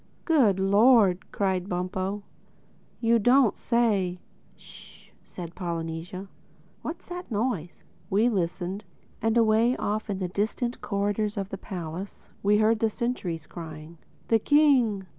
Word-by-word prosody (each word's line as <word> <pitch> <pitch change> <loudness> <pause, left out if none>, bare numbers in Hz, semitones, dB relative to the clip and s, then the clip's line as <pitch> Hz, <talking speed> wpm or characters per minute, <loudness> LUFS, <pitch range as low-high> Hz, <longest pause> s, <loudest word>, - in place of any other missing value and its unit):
"Good 245 - +4
Lord!" 200 -1 +4
cried 190 -1 -1
Bumpo. 185 +3 -2 0.8
"You 230 0 +4
don't 245 +1 +4
say!" 205 -7 +1 0.4
"Sh!" - - -16
said 170 -2 -9
Polynesia. 170 +2 -5 0.5
"What's 330 - -6
that 355 0 -7
noise?" 205 -7 -2 0.3
We 210 +5 +3
listened; 190 -1 -2 0.4
and 225 +1 +2
away 230 +2 +4
off 215 +1 -2
in 200 - -1
the 185 -1 -2
distant 220 +6 -2
corridors 205 +1 -1
of 195 -1 -3
the 195 - -5
palace 180 0 -7
we 205 +1 +4
heard 220 +1 +3
the 225 - +2
sentries 195 -9 -3
crying, 160 -1 -9 0.3
"The 225 - +4
King! 250 -8 +3
200 Hz, 125 wpm, -27 LUFS, 180-230 Hz, 0.8 s, Good